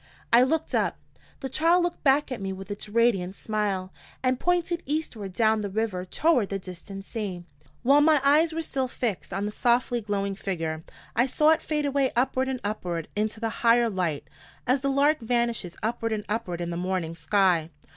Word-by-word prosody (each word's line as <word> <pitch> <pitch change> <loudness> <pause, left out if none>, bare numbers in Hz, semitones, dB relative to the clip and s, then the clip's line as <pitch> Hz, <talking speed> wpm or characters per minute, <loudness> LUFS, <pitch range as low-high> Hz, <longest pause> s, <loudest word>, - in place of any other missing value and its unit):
I 235 - +8
looked 310 +5 +1
up. - - +1 0.4
The 270 - -3
child 330 +6 +3
looked 350 0 -3
back 280 0 +3
at 250 - -4
me 195 0 -3
with 190 +1 -7
its 205 +1 -6
radiant 205 -5 +2
smile, 200 -4 -2 0.3
and 255 0 +1
pointed 350 -1 +1
eastward 260 -10 -3
down 220 +2 +2
the 205 - -3
river 195 -3 -2
toward 250 - +2
the 195 - -2
distant 195 +1 -9
sea. 200 -7 -5 0.4
While 280 +4 +6
my 305 0 +5
eyes 305 +4 +4
were 325 +1 -2
still 265 -4 -2
fixed 235 -6 -3
on 195 +2 -2
the 210 - -2
softly 240 +2 +1
glowing 200 -1 -2
figure, 165 -5 -3 0.3
I 240 +3 +3
saw 300 +4 +4
it 320 - +2
fade 300 -1 -1
away 280 -1 +1
upward 260 +2 +1
and 260 -1 -2
upward 180 -6 -3
into 215 +1 -1
the 225 0 -1
higher 235 0 +4
light, 175 -6 -2 0.4
as 255 +3 +2
the 275 - 0
lark 285 +3 +3
vanishes 235 -6 -1
upward 225 0 -1
and 210 -1 -3
upward 200 -5 -3
in 170 0 -3
the 170 - -3
morning 180 -2 -2
sky. 175 -2 +2
225 Hz, 190 wpm, -26 LUFS, 195-270 Hz, 0.4 s, I